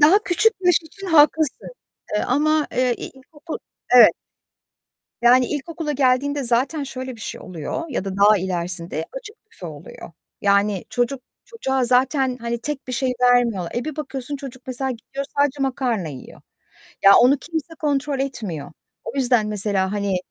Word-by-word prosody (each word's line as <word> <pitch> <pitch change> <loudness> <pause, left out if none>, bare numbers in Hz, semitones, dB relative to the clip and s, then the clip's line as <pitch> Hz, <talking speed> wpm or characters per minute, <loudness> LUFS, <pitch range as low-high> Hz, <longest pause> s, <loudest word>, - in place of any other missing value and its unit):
daha 315 +8 +7
küçük 390 +6 +3
yaş 355 -2 +4
için 390 +5 -11
haklısın, 310 -2 +3 0.5
eee, 210 - +1
ama, 305 +3 +2
eee, 250 -1 +1
ilkokul 295 +4 -9 0.4
Evet. 245 - +10 1.1
Yani, 250 +1 +6
ilkokula 305 +2 -4
geldiğinde 280 +1 +1
zaten 250 +6 +1
şöyle 260 -2 -6
bir - - -14
şey - - -6
oluyor 180 - -5
ya 250 -9 -3
da 195 -1 -4
daha 205 +1 +5
ilerisinde 175 -3 -3
açık 470 -3 -9
büfe 460 - -10
oluyor. - - -10 0.3
Yani, 200 -1 +2
çocuk 245 +2 -1 0.2
çocuğa 265 - -1
zaten, 255 +1 +2
hani, 235 0 -3
tek 295 +2 -5
bir - - -4
şey 255 +1 0
vermiyorlar. 240 -8 +3
E, 240 - -2
bir 310 -1 -5
bakıyorsun 285 -2 -5
çocuk, 260 -2 -10
mesela, 260 +1 -2
gidiyor 260 +3 -6
sadece 285 -1 +1
makarna 250 - -1
yiyor. 135 -4 -11 0.6
Ya, 195 - +8
onu 265 +3 +5
kimse 325 +1 -5
kontrol 285 -2 -1
etmiyor. 215 - -4 0.3
O - - -4
yüzden 245 -5 +3
mesela, 200 -2 0
hani, 200 -2 -1
260 Hz, 155 wpm, -22 LUFS, 220-290 Hz, 1.1 s, Evet